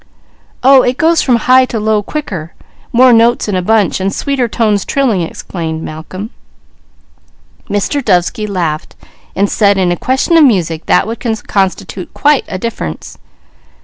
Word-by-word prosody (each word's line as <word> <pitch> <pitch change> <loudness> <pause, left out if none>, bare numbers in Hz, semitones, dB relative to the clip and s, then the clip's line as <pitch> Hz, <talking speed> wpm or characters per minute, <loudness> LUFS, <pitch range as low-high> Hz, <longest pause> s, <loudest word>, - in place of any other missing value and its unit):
"Oh, 265 0 +7
it 250 +1 -1
goes 325 +1 +3
from 250 - +2
high 255 +2 +4
to 235 -3 -4
low 215 0 +1
quicker, 190 - -6 0.4
more 250 +1 +5
notes 230 +1 +3
in 205 - -1
a 185 - 0
bunch, 210 0 +1
and 190 +1 -1
sweeter 270 +1 -1
tones 215 -3 0
trilling," 250 -9 0
explained 160 -1 -5
Malcolm. 185 +7 -7 1.4
Mr. 205 +8 -1
Dovesky 210 +3 0
laughed, 170 -6 -3 0.5
saying 200 -1 +2
in 185 -2 +1
a - - +1
question 265 - +1
of 320 - +6
music 170 - +1
that - - +3
would 225 +2 -5 0.3
constitute 190 -2 -2
quite 295 -2 +2
a 185 - -5
difference. 185 - -6
210 Hz, 145 wpm, -13 LUFS, 185-250 Hz, 1.4 s, Oh